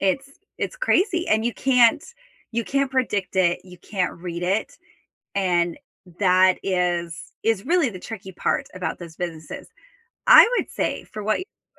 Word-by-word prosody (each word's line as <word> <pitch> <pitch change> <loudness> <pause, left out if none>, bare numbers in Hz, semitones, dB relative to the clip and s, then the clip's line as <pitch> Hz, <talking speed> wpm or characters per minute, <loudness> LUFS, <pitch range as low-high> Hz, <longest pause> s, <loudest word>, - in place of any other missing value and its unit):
it's 265 +9 0 0.3
it's - - -3
crazy, 375 -7 +1
and 220 +1 +2
you 240 - -1
can't 255 +1 +4 0.5
you 230 0 -1
can't 275 +1 0
predict 210 -8 -1
it, 175 -2 +3
you 180 -1 -14
can't 185 -1 -2
read 170 0 -6
it, 195 +5 -1 0.6
and 175 -1 +1 0.4
that 185 -1 +4
is 175 -3 -1
is 225 -3 +1
really 335 -5 +2
the 185 - -8
tricky 190 -4 -8
part - - -1
about 185 0 -4
this 170 -2 -10
businesses. 160 -4 -6 0.6
I - - +10
would - - -1
say - - -2
for 215 -1 -8
what 215 +1 +1
you're 370 - -12
195 Hz, 160 wpm, -23 LUFS, 180-245 Hz, 0.6 s, I